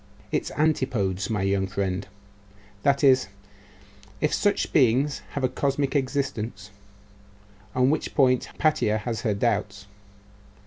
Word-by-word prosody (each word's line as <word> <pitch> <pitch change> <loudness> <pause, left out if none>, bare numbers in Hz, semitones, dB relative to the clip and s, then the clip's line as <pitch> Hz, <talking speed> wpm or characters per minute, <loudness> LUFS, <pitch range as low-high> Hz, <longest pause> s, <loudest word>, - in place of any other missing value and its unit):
Its - - -1
antipodes, 125 -11 0
my 105 -4 -1
young 95 0 +1
friend 95 0 -2 0.7
that 140 +3 +2
is, 130 -5 +5 0.9
if 150 - 0
such 205 -1 +1
beings 135 +1 +3
have 140 - -3
a - - +4
cosmic 140 +2 -1
existence, 120 -7 -2 1.0
on 130 +1 +3
which 155 - -2
point 130 -3 +3
Hypatia 150 -9 +1
has 110 +1 -4
her 105 -4 0
doubts. 100 -2 -1
125 Hz, 120 wpm, -25 LUFS, 100-140 Hz, 1.0 s, is